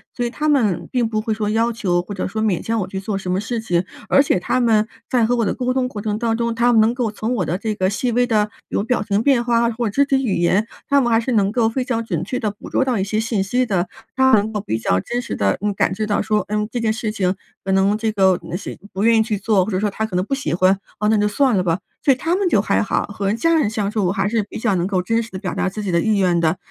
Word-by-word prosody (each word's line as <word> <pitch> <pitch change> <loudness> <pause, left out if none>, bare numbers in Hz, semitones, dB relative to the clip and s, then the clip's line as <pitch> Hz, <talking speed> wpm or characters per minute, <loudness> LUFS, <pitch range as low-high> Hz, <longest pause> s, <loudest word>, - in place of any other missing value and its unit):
所 245 - -1
以 240 - -1
他 300 +5 -3
们 210 - +1
并 240 -3 0
不 215 - -1
会 220 0 -1
说， 210 -1 -2
要 230 +2 +1
求 180 -6 0
或 190 +3 -8
者 190 - -3
说 220 +3 -3
勉 210 -5 0
强 225 0 -1
我 185 - -2
去 190 0 -5
做 195 0 -2
什 185 -2 -5
么 185 +2 0
事 230 +2 -3
情。 175 -5 0 0.2
而 275 - +5
且 185 - +1
他 255 +7 0
们 220 -2 +3 0.2
在 245 -3 +3
和 245 +2 +1
我 230 - +1
的 - - 0
沟 255 -1 -1
通 255 -1 0
过 210 -3 -6
程 210 0 -2
当 225 -1 0
中， 235 -1 -1
他 240 +1 +3
们 225 - +5
能 220 +2 +4
够 235 -4 -1
从 220 +3 -3
我 180 -6 -1
的 175 +4 -1
这 215 0 -3
个 185 -2 +1
细 235 +4 -1
微 245 +1 +3
的 215 -4 +2 0.2
比 - - -2
如 200 - 0
表 245 -3 0
情 205 0 0
变 255 -2 +3
化 235 -1 +2
或 230 -1 -2
肢 280 +7 +2
体 270 -1 +1
语 215 - 0
言， 190 +5 +2 0.2
他 280 -1 +4
们 240 -2 +1
还 225 - +4
是 240 +2 -2
能 200 -2 +2
够 230 -1 +2
非 250 +3 -1
常 230 -2 -2
准 170 -5 -2
确 250 +7 -3
地 215 - -1
捕 205 - -12
捉 265 - +1
到 250 -3 0
一 190 - 0
些 215 +2 -1
信 220 -3 0
息 250 +6 0
的， 185 -4 -1 0.3
他 265 0 +4
们 215 - +6
能 220 +2 -5
够 210 - -2
比 110 - -2
较 95 -4 +1
真 240 - -3
实 - - -5
地， 100 -1 +1
嗯， 205 0 -1
感 190 - +1
知 215 +2 -3
到 205 - +1
说， 215 0 0
嗯， 210 0 -1
这 245 - -2
件 225 -1 +1
事 220 -2 -3
情 190 -3 0 0.3
可 195 - -2
能 195 +2 +3
这 220 0 -1
个， 190 -3 +3
呃， 175 - -2
是 200 - -7 0.2
不 195 - -2
愿 230 0 +5
意 220 - +4
去 215 -2 -2
做， 205 -2 +2
或 220 - -4
者 185 - 0
说 210 - -1
我 220 +2 -2
可 195 -5 -6
能 180 - +2
不 275 - -3
喜 270 - -3
欢， 185 +2 +3 0.2
哦， 210 - +1
那 220 - +3
就 210 0 +2
算 255 +2 +2
了 185 - +1
吧。 170 +1 0 0.2
所 275 - +5
以 - - -4
他 335 +6 0
们 395 -1 +1
就 - - +3
还 - - +1
好， - - 0
和 205 0 -2
家 330 +9 +2
人 305 -9 +2
相 210 -2 -2
处 210 -3 -1
我 180 - +1
还 195 +1 0
是 225 -2 0
比 205 - -8
较 215 -4 +1
能 175 0 0
够 190 -2 0
真 225 +5 0
实 225 - -10
地 185 - -6
表 185 -3 -4
达 - - 0
自 210 +3 -6
己 200 -3 -2
的 170 - +2
意 215 -2 +1
愿 180 -3 +2
的。 165 +2 +1
215 Hz, 345 characters per minute, -20 LUFS, 195-235 Hz, 0.3 s, 们